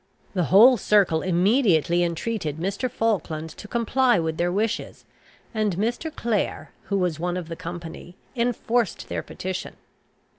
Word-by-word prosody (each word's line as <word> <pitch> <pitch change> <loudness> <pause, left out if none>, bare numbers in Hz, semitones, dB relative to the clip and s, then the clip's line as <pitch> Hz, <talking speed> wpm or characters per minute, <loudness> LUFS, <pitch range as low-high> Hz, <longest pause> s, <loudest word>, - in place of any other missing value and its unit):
The 180 -4 +1
whole 235 +9 +7
circle 190 -6 +3
immediately 180 - +3
entreated 170 -2 -2
Mr. 195 +9 -2
Falkland 180 -10 -1
to 210 - -11
comply 240 +1 +2
with 160 -1 -1
their 175 +1 +1
wishes, 215 +4 -2 0.5
and 215 -4 0
Mr. 240 +10 -1
Clare, 230 -8 -2
who 200 +1 -1
was 180 -5 0
one 175 +1 -1
of 170 -2 -6
the 165 - -4
company, 175 0 -8 0.2
enforced 240 -2 0
their - - -2
petition. 185 0 -6
190 Hz, 140 wpm, -24 LUFS, 170-230 Hz, 0.5 s, whole